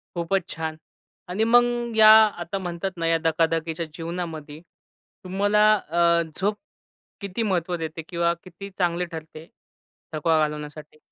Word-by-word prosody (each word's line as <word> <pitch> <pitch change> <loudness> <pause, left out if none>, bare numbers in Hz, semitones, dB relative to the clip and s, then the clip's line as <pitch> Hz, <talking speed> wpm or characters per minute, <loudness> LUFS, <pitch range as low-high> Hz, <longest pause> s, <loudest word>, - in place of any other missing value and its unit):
खूपच 175 +2 -1
छान 160 -1 -4 0.5
आणि 190 +5 0
मग 240 0 +2
या 215 -1 +8 0.3
आता 180 +4 -4
म्हणतात 180 0 -4
ना, 165 -1 -2
या 165 0 +3
धकाधकीच्या 165 0 0
जीवनामध्ये 165 -3 -6 0.6
तुम्हाला 205 +3 +2
अ, 170 -2 +2
झोप 205 +2 0 0.7
किती 200 +3 -3
महत्त्व 180 -3 -1
देते? 165 0 -5
किंवा 170 -1 +1
किती 185 +2 -10
चांगली 175 -1 0
ठरते 160 -1 -9 0.7
थकवा 160 +1 +2
घालवण्यासाठी? 150 0 -4
170 Hz, 125 wpm, -24 LUFS, 160-195 Hz, 0.7 s, या